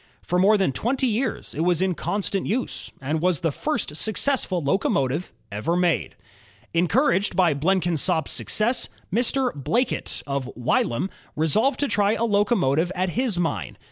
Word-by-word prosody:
For 180 - 0
more 205 +3 +5
than 190 -8 +1
twenty 250 - 0
years 235 0 -2
it - - -7
was 175 0 +2
in 190 0 +1
constant 200 +2 -2
use, 245 +5 -2
and 150 +4 -2
was 180 -3 +1
the 165 -2 +1
first 235 - -2
successful 220 -3 +1
locomotive 145 -1 0 0.2
ever 110 +12 -1
made. 175 -2 0 0.6
Encouraged 195 - +2
by 175 -4 +4
Blenkinsop's 165 -1 +1
success, 235 +4 +1 0.2
Mr. 250 +2 +1
Blackett, 230 - -1
of 140 -2 -3
Wylam, 125 +7 0 0.2
resolved 215 - +1
to 285 - +2
try 205 -2 +2
a 230 - -1
locomotive 200 - +2
at 185 0 0
his 235 -2 0
mine. 115 - -2
185 Hz, 145 wpm, -24 LUFS, 160-220 Hz, 0.6 s, more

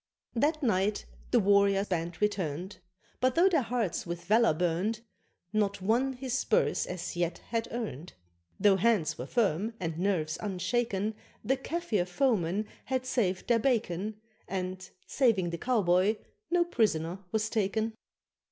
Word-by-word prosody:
That 300 +6 +1
night 205 -3 +1 0.2
the - - +4
warrior 200 0 +4
band 175 -2 -3
returned, 185 -3 -2 0.4
But 255 0 +2
though 350 +3 +6
their 335 -7 +3
hearts 235 -6 -1
with 170 0 -6
valour 220 -3 +4
burned, 180 +7 0 0.5
Not 205 -2 +1
one 235 +8 +1
his 255 -1 -5
spurs 250 -3 +1
as 180 -1 -5
yet 175 0 -1
had 230 0 -1
earned. 210 - -5 0.5
Though 200 -2 +5
hands 195 - +2
were 125 - -4
firm 215 0 0
and 165 -2 -3
nerves 175 -5 0
unshaken, 210 +1 -1 0.3
The 265 - +2
Kafir 270 - -1
foemen 205 -3 +1 0.2
had 260 -1 -1
saved 200 -8 0
their 235 -1 +4
bacon, 215 -4 0 0.3
And 185 0 -4 0.2
(saving 210 -10 +2
the 170 - -4
cowboy) 200 -3 +3 0.3
no 345 0 +3
prisoner 185 - 0
was 220 0 +1
taken. 220 +1 0
205 Hz, 140 wpm, -30 LUFS, 180-235 Hz, 0.5 s, though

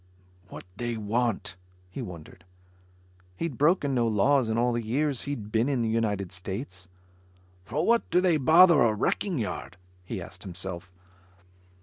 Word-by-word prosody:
"What - - -9
they 120 -1 -3
want?" 110 -3 -1 0.3
he 130 - -6
wondered. 85 -4 -10 0.9
He'd 165 - -4
broken 150 -2 +3
no 120 -2 +2
laws 115 +4 +2
in 110 - 0
all 120 +1 +2
the 120 - -1
years 135 +4 0
he'd 110 -7 -5
been 115 +5 +2
in 130 -4 0
the 115 - 0
United 105 -5 -1
States. 95 +1 -6 0.8
"For 155 - -1
what 235 0 +2
do 175 - +3
they 180 -3 +3
bother 160 +3 +6
a 115 -3 +3
wrecking 175 - -1
yard?" 100 -4 -4 0.3
he - - -5
asked - - -10
himself. 90 -1 -6
115 Hz, 150 wpm, -27 LUFS, 100-145 Hz, 0.9 s, bother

